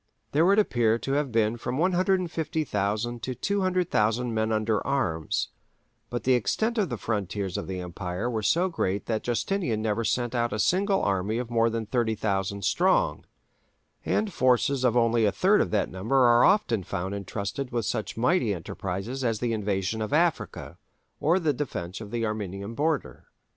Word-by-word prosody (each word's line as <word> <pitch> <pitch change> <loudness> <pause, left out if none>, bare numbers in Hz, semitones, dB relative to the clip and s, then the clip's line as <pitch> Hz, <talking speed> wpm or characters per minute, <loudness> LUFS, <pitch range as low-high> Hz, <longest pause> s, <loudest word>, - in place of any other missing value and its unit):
There 160 +4 +3
would 200 +2 +4
appear 120 - +3
to 135 - -4
have 140 -1 0
been 115 0 +1
from 120 +2 -3
150,000 160 - 0
to 130 +1 -4
200,000 165 - 0
men 110 0 0
under 110 0 0
arms, 90 - -1 0.6
but 120 - -3
the 130 - +3
extent 220 - +1
of 195 -6 +1
the 120 - -3
frontiers 100 -3 -3
of - - -3
the 95 -1 -4
empire 90 +4 -4
were 115 -3 -1
so 165 - +2
great 100 - -2
that 110 -1 -1
Justinian 120 - -1
never 110 +1 0
sent 120 +2 0
out 120 -1 0
a - - -1
single 195 - +2
army 100 +3 0
of 120 -1 -4
more 115 0 +3
than 115 -1 -3
30,000 100 -4 -1
strong, 190 - +2 0.8
and 210 -3 0
forces 130 +1 +2
of 125 -1 +3
only 115 -1 +3
a 105 - +3
third 200 - +3
of - - 0
that 105 -2 0
number 95 +8 -2
are 120 -2 +6
often 190 - +3
found 95 +1 -4
entrusted 100 +6 -4
with 120 -3 -1
such 110 - -3
mighty 120 - +2
enterprises 95 +9 -5
as 115 -3 +1
the 120 +1 -1
invasion 100 0 -1
of 110 - -3
Africa 165 +1 0 0.4
or 165 +4 +3
the 155 -5 +1
defence 105 -9 -5
of 105 - -8
the 115 +1 -1
Armenian 100 -1 -4
border. 145 - -2
115 Hz, 170 wpm, -27 LUFS, 105-140 Hz, 0.8 s, are